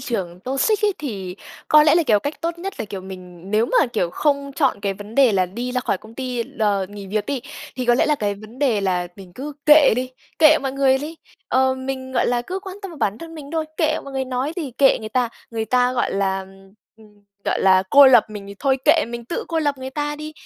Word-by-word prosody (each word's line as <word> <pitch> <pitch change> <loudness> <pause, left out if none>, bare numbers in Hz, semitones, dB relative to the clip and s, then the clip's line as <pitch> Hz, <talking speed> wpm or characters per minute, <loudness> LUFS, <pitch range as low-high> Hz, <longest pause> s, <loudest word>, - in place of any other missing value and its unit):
trường 185 -9 -4
toxic 275 - 0
ấy, 410 - +3
thì 195 -10 -5 0.3
có 305 0 +7
lẽ 300 +1 +5
là, 340 - +4
kiểu, 220 -8 +3
cách 285 +7 -5
tốt 335 +2 -3
nhất 390 +3 -5
là, - - -2
kiểu, 200 -2 -7
mình 185 -1 -11
nếu 215 +3 +2
mà, 295 - +3
kiểu, 210 -8 -1
không 280 +1 0
chọn 270 -9 +1
cái 195 -1 -2
vấn 205 +3 -11
đề 265 -5 +5
là 185 -2 +2
đi 240 +7 -5
ra 250 - 0
khỏi 195 - -1
công 220 +1 -15
ty 250 -2 -3
l - - -7 0.3
nghỉ 205 -1 -9
việc 210 +1 -2
đi, 275 -3 -2 0.4
thì 255 - -2
có 240 0 +4
lẽ - - +2
là 300 - +3
cái 205 -7 -2
vấn 215 +5 -13
đề 245 -8 +2
là 180 -2 -1
mình 190 -2 -13
cứ 290 +3 -6
kệ 300 -4 +7
đi, 255 +1 -2 0.3
kệ 310 0 +7
mọi 270 -1 -3
người 270 -1 +3
đi. 310 +3 -7 0.3
Ờ, 260 0 +2
mình, 260 0 -5
gọi - - +1
là, 240 0 0
cứ 370 +8 -4
quan 380 -1 -8
tâm 390 - -6
vào 320 - -11
bản 210 -2 -1
thân 330 0 -10
mình 285 -3 -9
thôi, 320 -1 -1
kệ 310 -1 +1
mọi 275 - -9
người 265 0 -2
nói 260 +4 -2
gì, 300 -7 -4
kệ 275 -1 +5
người 215 - -6
ta, 245 +1 0 0.2
người 225 -1 -2
ta, 250 +3 +2
gọi 250 - -1
là, 195 -1 0
ừm, 195 0 -15 0.2
ừm, 210 -2 -21 0.2
gọi - - 0
là, 185 -1 +5
cô 280 -1 +9
lập 245 -4 +7
mình 205 -2 -8
thì 200 - -9
thôi 270 -2 +2
kệ, 310 +2 +5
mình 235 0 -6
tự 290 - -4
cô 330 -1 -1
lập 290 -3 0
người 260 0 -6
ta 295 +1 -3
đi, 305 +1 -7
255 Hz, 260 wpm, -21 LUFS, 205-290 Hz, 0.4 s, cô